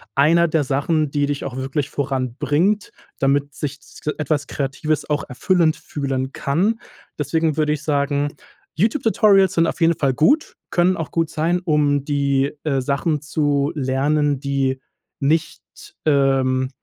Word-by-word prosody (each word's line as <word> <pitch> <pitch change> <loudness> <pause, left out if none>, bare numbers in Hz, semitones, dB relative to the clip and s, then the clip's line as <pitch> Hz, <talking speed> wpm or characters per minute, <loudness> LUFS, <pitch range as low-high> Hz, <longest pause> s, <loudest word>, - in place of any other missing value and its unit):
einer 165 +5 +4
der 155 -2 +1
Sachen, 145 +3 0
die 145 -1 +1
dich 145 -1 -3
auch 130 -2 -5
wirklich 135 +2 -2
voranbringt, 145 - 0 0.3
damit 140 +1 +1
sich 150 -1 -4
s - - -16 0.2
etwas 145 -1 0
Kreatives 145 +3 -2
auch 145 -1 0
erfüllend 165 +4 +2
fühlen 135 -2 -3
kann. 195 +11 0 0.4
Deswegen 160 +1 0
würde 150 -1 +2
ich 150 - -4
sagen, 145 -1 0 0.4
YouTube 225 - +1
Tutorials 200 -4 +4
sind 165 0 +4
auf - - -4
jeden 165 0 +4
Fall 135 -2 +1
gut, 275 - +2 0.2
können 180 +1 +2
auch 165 - -4
gut 165 -2 0
sein, 170 +3 0
um 145 -3 +2
die, 140 -1 +1
äh, 135 -3 +1
Sachen 145 +3 -1
zu 145 -1 0
lernen, 145 +1 +1
die 135 -1 -1 0.4
nicht 155 +3 0 0.4
ähm, 135 -3 +2
145 Hz, 145 wpm, -21 LUFS, 140-160 Hz, 0.4 s, einer